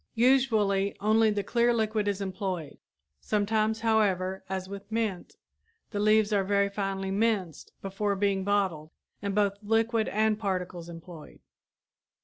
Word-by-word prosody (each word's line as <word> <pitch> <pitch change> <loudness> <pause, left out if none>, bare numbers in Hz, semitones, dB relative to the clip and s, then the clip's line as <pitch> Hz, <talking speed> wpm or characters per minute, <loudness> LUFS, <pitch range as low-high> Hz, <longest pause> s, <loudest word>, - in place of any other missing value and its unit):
Usually 220 -6 +2
only 220 +2 +3
the 205 -1 -1
clear 235 +3 +2
liquid 215 -2 0
is 200 -1 -1
employed; 185 -4 -4 0.4
sometimes, 215 +1 0
however, 190 -4 +1
as 190 -1 -3
with 200 +2 -9
mint, 220 -5 -2 0.6
the 205 - -3
leaves 215 0 +3
are 200 -1 +3
very 200 +1 +2
finely 195 -1 -3
minced 200 -6 -1
before 200 +1 -1
being 195 -1 0
bottled 190 -6 0 0.3
and 200 -1 -3
both 200 -1 +1
liquid 225 +1 +1
and 215 0 +1
particles 180 -4 -3
employed. 165 -1 -11
205 Hz, 130 wpm, -28 LUFS, 190-220 Hz, 0.6 s, only